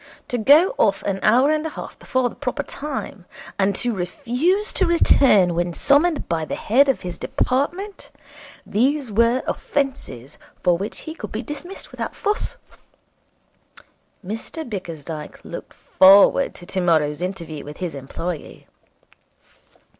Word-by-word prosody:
To 245 - -1
go 295 - +6
off 195 -2 +2
an 195 -1 -2
hour 255 +7 +4
and 310 0 0
a 320 - -3
half - - -9
before 260 -2 0
the - - -8
proper 285 +1 -3
time, 275 -11 -6 0.3
and 195 0 +2
to 240 +3 -1
refuse 275 - 0
to 380 - +2
return 255 - +4
when 175 0 -1
summoned 295 +3 +3
by 165 -2 -1
the - - -4
head 270 +6 +3
of 270 - +1
his 180 -1 -6
department 350 +10 -2 0.6
these 260 +3 0
were 235 +4 +2
offences 265 - -3 0.2
for 180 -2 +4
which 195 +5 -5
he 315 - -7
could 215 -10 -8
be 220 +3 -4
dismissed 300 - -8
without - - -5
fuss. 425 +4 -2 1.7
Mr 225 - -6
Bickersdyke 165 -7 -7
looked - - -8
forward 195 +8 +5
to 175 - -11
tomorrow's 165 -5 +1
interview 170 -5 -5
with 150 +1 -9
his 180 -3 -4
employee. 145 +4 -6
225 Hz, 140 wpm, -22 LUFS, 180-285 Hz, 1.7 s, go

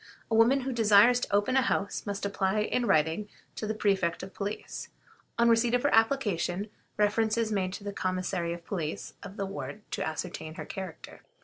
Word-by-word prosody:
A - - +3
woman 240 +5 +5
who 260 0 -3
desires 225 +2 +6
to - - -4
open 205 +5 +2
a 265 - +5
house 200 -3 -1
must 200 0 -3
apply 200 +1 0
in 240 +3 0
writing 160 +7 +2 0.3
to 215 - -4
the 220 - -1
Prefect 195 -5 +1
of 190 - -8
Police. 205 +1 -5 0.5
On 235 0 +4
receipt 230 +1 +4
of 245 - 0
her 285 - +2
application, 210 -5 +1 0.3
reference 215 +1 +2
is 225 -1 0
made 190 -3 0
to 205 - -7
the 205 0 -4
Commissary 185 -2 -1
of 170 0 -6
Police 165 -6 -4
of 200 0 -9
the 200 - -1
ward 200 +1 -6
to - - -2
ascertain 160 0 -5
her - - -6
character. 190 -4 -8
205 Hz, 195 wpm, -29 LUFS, 185-225 Hz, 0.5 s, desires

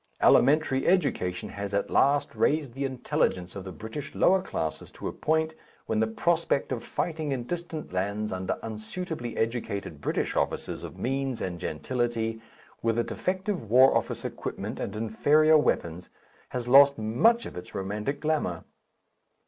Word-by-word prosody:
Elementary 135 0 +4
education 105 - +1
has 100 0 -4
at 100 - -1
last 140 +1 +3
raised 145 -5 +1
the 135 +2 -2
intelligence 95 -8 -1
of 100 - -6
the 95 - -7
British 110 - -7
lower 190 0 +4
classes 80 - -4
to - - -7
a - - -2
point 160 +1 0 0.3
when 110 - 0
the 110 - +2
prospect 160 +5 0
of 125 -3 -2
fighting 155 -3 -2
in 130 -3 -1
distant 165 - -5
lands 100 +3 -1
under 95 0 -2
unsuitably 120 +4 -5
educated 105 -9 -2
British - - -1
officers - - -1
of - - -8
means 135 -1 -1
and 90 -2 -4
gentility 115 +5 -2 0.4
with 115 0 +1
a 120 - +3
defective 185 - -3
War 130 +3 +6
Office - - -1
equipment - - -5
and 100 - -4
inferior 150 +8 +4
weapons 85 - -1 0.4
has 125 -1 -4
lost 140 +2 +7
much 125 - +3
of - - -8
its 90 - -9
romantic 105 +8 -3
glamour. 150 - -1
120 Hz, 150 wpm, -27 LUFS, 105-150 Hz, 0.4 s, lost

